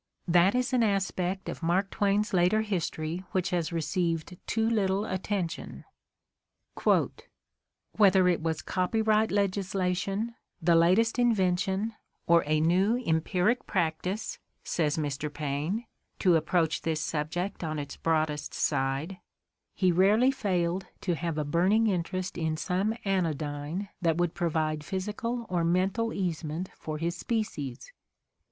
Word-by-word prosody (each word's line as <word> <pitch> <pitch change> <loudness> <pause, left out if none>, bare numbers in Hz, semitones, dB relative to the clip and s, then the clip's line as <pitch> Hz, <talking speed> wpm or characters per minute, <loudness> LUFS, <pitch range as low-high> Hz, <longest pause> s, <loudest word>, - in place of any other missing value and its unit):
That 175 +5 +4
is 250 +1 0
an 250 - +4
aspect 190 -3 0
of - - -5
Mark 180 +4 +1
Twain's 205 0 +1
later 185 +5 +3
history 175 -4 -2
which 185 -1 0
has 175 -2 0
received 170 0 -1
too 225 +2 +1
little 205 -3 +1
atten 190 -1 -1
tion. 170 - -9 2.1
"Whether 190 -3 +5
it 175 -2 +2
was 160 -1 -2
copyright 215 +3 +1
legislation, 195 +2 -1 0.3
the 170 +1 +3
latest 185 +9 +4
invention, 195 -2 +1 0.3
or 170 0 +5
a 155 0 +2
new 185 +8 +3
empiric 180 +8 +1
practice, 180 +5 -1
' - - -50
' - - -46
says 155 -3 0
Mr. 150 -1 -2
Paine 150 +10 -2 0.2
— - - -48
to 180 -4 +5
approach 165 0 +1
this 160 -1 -1
subject 165 +6 -3
on 155 -1 -2
its 145 -1 -5
broadest 155 -2 -1
side 140 +6 -1 0.3
— - - -57
"he 185 -2 +3
rarely 205 +9 +4
failed 185 -7 -1
to 180 - 0
have 165 -1 -3
a 150 - -1
burning 185 +9 +3
interest 185 -2 -2
in 160 -1 -1
some 195 +6 0
anodjrne 160 -1 -1
that 165 -2 +2
would 175 -1 +1
provide 155 -2 -1
physical 210 +7 -3
or 175 -2 0
mental 190 +7 +1
easement 170 -2 -3
for 155 -1 -5
his 170 +2 -2
species." 175 - -3
180 Hz, 135 wpm, -28 LUFS, 160-200 Hz, 2.1 s, Whether